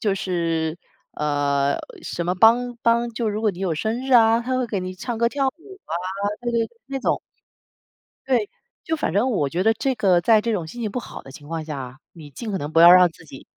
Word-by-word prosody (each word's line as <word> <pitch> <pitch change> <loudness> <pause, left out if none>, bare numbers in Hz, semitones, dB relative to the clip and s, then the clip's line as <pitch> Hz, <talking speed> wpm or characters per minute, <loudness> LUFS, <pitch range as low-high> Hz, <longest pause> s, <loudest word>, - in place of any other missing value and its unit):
就 205 -3 +1
是， 165 -3 -2 0.3
呃， 145 -1 0 0.3
什 170 - -4
么 180 - 0
帮 240 +5 +4
帮 235 0 +2
就 230 -1 -2
如 210 +1 -3
果 215 - +3
你 180 - -12
有 185 -4 -1
生 230 - -3
日 265 - -1
啊， 225 0 +6
它 255 +2 -2
会 255 - 0
给 205 -5 -3
你 185 0 -5
唱 225 +4 -5
歌 235 0 +3
跳 275 +1 0
舞 385 +7 -11
啊， - - -9 0.5
对 240 0 -2
对， 230 -1 +1 0.2
那 275 0 -4
种。 - - 0 1.1
对。 240 -6 +1 0.4
就 320 - -1
反 280 - -2
正 210 +8 +2
我 150 - 0
觉 175 +6 -1
得 225 +3 +4
这 265 +3 -1
个 190 -6 +3
在 215 +4 +4
这 230 +1 -2
种 180 -6 -2
心 240 +9 -9
情 215 - -2
不 250 - -3
好 - - -9
的 135 - -13
情 145 +2 -13
况 165 0 -4
下， 135 -3 -7
你 155 -4 -12
尽 215 - -7
可 195 - -2
能 145 +2 -5
不 165 - +4
要 170 +1 +10
让 180 0 +8
自 160 - -17
己 135 -3 -13
205 Hz, 250 characters per minute, -22 LUFS, 165-235 Hz, 1.1 s, 要